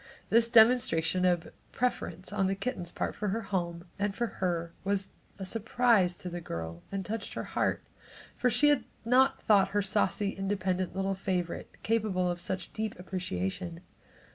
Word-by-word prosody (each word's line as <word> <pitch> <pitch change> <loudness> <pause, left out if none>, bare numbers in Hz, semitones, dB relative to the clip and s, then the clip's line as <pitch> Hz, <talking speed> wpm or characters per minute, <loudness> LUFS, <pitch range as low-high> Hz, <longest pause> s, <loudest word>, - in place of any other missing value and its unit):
This 230 +1 +6
demonstration 220 -7 +5
of 175 -2 +1 0.2
preference 215 -6 -2
on 195 -2 +2
the 195 - 0
kitten's 195 -5 -4
part - - -2
for 210 - -3
her 220 +4 0
home, 175 -5 -3
and 205 -1 0
for 235 - 0
her, 170 -5 -2
was 195 0 -1 0.3
a 195 - -5
surprise 225 -3 +2
to 180 - -8
the 175 0 -5
girl 85 - -5
and 195 -1 -3
touched 220 0 -4
her - - -3
heart, - - -1 0.5
for 250 - +2
she 295 +5 +5
had 290 -3 +3 0.2
not 260 +3 +4
thought 200 -3 +5
her - - +4
saucy, 195 +1 +1
independent 190 -2 -1
little 195 0 0
favorite 185 -2 -2
capable 205 -5 +1
of 175 0 -5
such 185 0 -4
deep 220 -1 -3
appreciation. 180 -1 -3
195 Hz, 165 wpm, -30 LUFS, 180-220 Hz, 0.5 s, This